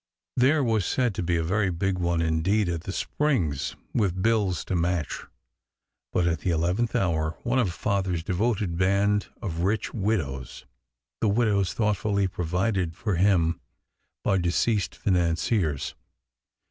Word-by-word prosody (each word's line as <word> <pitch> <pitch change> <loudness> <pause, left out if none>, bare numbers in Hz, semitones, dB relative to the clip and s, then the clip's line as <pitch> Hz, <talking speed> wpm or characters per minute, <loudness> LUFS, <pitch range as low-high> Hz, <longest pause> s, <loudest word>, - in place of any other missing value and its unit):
There 140 +4 +4
was 110 -4 +2
said 120 +4 +1
to - - -3
be 85 0 +1
a 80 - 0
very 100 +4 +1
big 90 +2 -1
one 85 -1 +1
indeed, 85 +6 +1
at 85 -1 -3
the - - -3
Springs, 95 - -1 0.2
with 95 -5 +1
bills 105 -6 +1
to 95 - -2
match; 85 -2 -1 0.9
but 90 - +1
at 85 -2 +1
the 90 - -2
eleventh 90 +9 0
hour 80 -7 0
one 125 +2 +1
of 105 -8 +1
Father 95 0 -1
s 80 -2 -2
devoted 95 -2 0
band 100 +2 +2 0.2
of 85 -6 -3
rich 100 +4 0
widows 85 - -2 0.5
(the 110 - +2
widows 100 -3 +2
thoughtfully 105 -2 +1
provided 90 0 -1
for 105 -5 -1
him 85 -3 +3 0.6
by 95 - +2
deceased 90 +4 +1
financiers) 85 - 0
95 Hz, 145 wpm, -26 LUFS, 85-105 Hz, 0.9 s, There